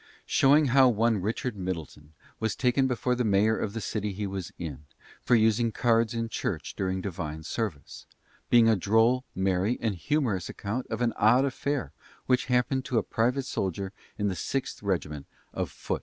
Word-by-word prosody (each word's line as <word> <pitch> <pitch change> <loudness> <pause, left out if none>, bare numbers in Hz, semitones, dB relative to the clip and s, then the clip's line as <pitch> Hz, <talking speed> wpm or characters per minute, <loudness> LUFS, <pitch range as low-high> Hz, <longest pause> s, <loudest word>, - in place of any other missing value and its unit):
Showing 145 +1 +4
how 135 -1 +7
one 115 -2 +2
Richard 110 +4 -2
Middleton 80 -5 -6 0.3
was 110 -1 -1
taken 130 +1 +2
before 125 0 0
the 125 0 0
Mayor 105 +1 +3
of 100 - -3
the 115 - -3
City 105 -2 -3
he 105 +2 -3
was 95 -2 -5
in, 75 -4 -7 0.4
for 120 - +3
using 110 +1 +3
cards 115 +1 +2
in 115 0 -1
church - - -4
during 95 -1 -1
divine 80 -5 -5
service; 105 -6 -5 0.4
being 120 -2 +6
a 110 - +5
droll, 115 +6 +3
merry, 95 +4 +1
and 110 -3 0
humourous 105 - -1
account 115 +6 -4
of 115 +1 -4
an 115 -2 +1
odd 120 +6 +5
affair 140 0 -2 0.4
that 125 -1 +3
happened 125 +1 +1
to 125 - -1
a - - +2
private 125 +4 0
soldier 95 -3 -3 0.2
in 105 - 0
the 95 - 0
6th 135 +9 -3
Regiment 75 -8 -2 0.3
of - - -2
Foot. - - -4
110 Hz, 175 wpm, -28 LUFS, 95-125 Hz, 0.4 s, how